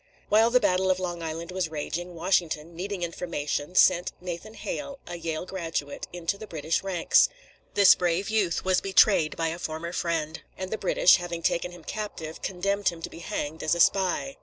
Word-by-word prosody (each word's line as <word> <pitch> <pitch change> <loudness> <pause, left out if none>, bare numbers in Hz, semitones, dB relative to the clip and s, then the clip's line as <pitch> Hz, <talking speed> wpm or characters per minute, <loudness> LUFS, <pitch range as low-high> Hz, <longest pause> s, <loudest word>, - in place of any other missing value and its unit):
While 220 +2 +5
the 250 +1 +5
battle 185 -3 +2
of 185 - +3
Long 175 -2 -4
Island 165 +2 -5
was 180 -3 -1
raging, 170 +3 -4
Washington, 170 -2 0
needing 190 +1 -4
information, 170 -2 -3
sent 180 -1 +4
Nathan 180 +5 -7
Hale, 285 -1 -5
a 175 - -6
Yale 165 0 -4
graduate, 165 -6 -4
into 175 +3 -3
the 215 - -8
British 160 -1 -1
ranks. 185 -4 +3 0.5
This 200 -2 +8
brave 175 +2 0
youth 210 -7 0
was 185 -1 +3
betrayed 195 -4 +4
by 165 -1 0
a 165 +2 -5
former 165 +1 -4
friend, 160 -3 -2 0.2
and 185 0 -5
the 220 - -1
British, 185 -1 +5
having 175 -1 -5
taken 170 +1 +1
him 175 -2 -13
captive, 165 -7 -6
condemned 200 +2 0
him 165 -2 -9
to - - -5
be - - -10
hanged 160 -1 -4
as 160 - +1
a - - -4
spy. 195 +10 +2
175 Hz, 185 wpm, -27 LUFS, 165-190 Hz, 0.5 s, This